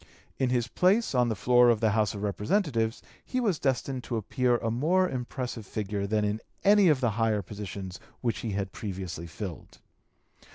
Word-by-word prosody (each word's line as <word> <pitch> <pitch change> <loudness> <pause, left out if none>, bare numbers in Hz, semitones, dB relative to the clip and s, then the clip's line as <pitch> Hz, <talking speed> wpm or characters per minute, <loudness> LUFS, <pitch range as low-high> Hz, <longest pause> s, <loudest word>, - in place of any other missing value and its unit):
In 130 - +2
his 120 -2 +1
place 190 - +2
on 125 -2 +3
the 110 - -1
floor 125 +4 +5
of 115 -2 +3
the 110 -1 +2
House 105 -1 +1
of 100 - -5
Representatives 115 - 0 0.2
he 255 - -2
was 205 -10 +1
destined 130 -1 -1
to 120 - -2
appear 120 +3 +1
a 115 -1 -2
more 170 +10 +2
impressive 125 -3 -4
figure 100 0 -3
than 105 0 +1
in 105 +2 -1 0.2
any 205 -1 +6
of 150 -5 +3
the 120 -3 +2
higher 110 -1 +1
positions 100 -1 -7 0.2
which 120 -2 -1
he 110 -3 -3
had 95 -1 -2
previously 95 -5 -5
(p. 80 - -13
227) 95 -7 -5
filled. - - -22
115 Hz, 195 wpm, -28 LUFS, 105-130 Hz, 0.2 s, any